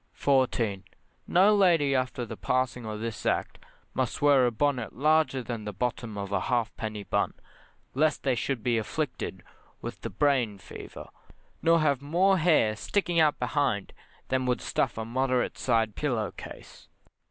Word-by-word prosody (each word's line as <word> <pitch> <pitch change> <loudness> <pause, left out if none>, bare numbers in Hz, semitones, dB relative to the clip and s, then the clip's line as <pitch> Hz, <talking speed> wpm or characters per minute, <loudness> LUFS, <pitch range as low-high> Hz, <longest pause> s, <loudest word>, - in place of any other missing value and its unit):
14. 120 -8 +1 0.4
No 195 +4 +5
lady 170 -8 +4
after 130 -1 -1
the - - -7
passing 125 -2 -1
of 105 0 -5
this 115 -1 -4
Act - - -1 0.3
must - - -1
wear 140 -3 +5
a - - 0
bonnet 125 0 -1
larger 150 -1 +2
than 115 -2 -5
the 105 - -4
bottom 115 +1 -3
of 100 0 -5
a 100 - +1
halfpenny 110 -1 -2
bun, - - -1 0.6
lest 155 +2 +1
they 135 - +2
should 125 -1 -2
be 120 -2 +2
afflicted 150 +6 -4 0.4
with - - -7
the - - -4
brain 130 -8 +1
fever, 85 -5 -10 0.5
nor 165 0 +4
have 140 -4 +2
more 180 +6 +3
hair 155 -10 +3
sticking 175 - 0
out 155 -2 +4
behind 125 -5 -1 0.4
than 130 -1 0
would 125 -2 +1
stuff - - -1
a 110 - -3
moderate 130 +1 0
side 115 -3 +1
pillow 120 -9 -1
case. - - -12
125 Hz, 155 wpm, -28 LUFS, 110-145 Hz, 0.6 s, No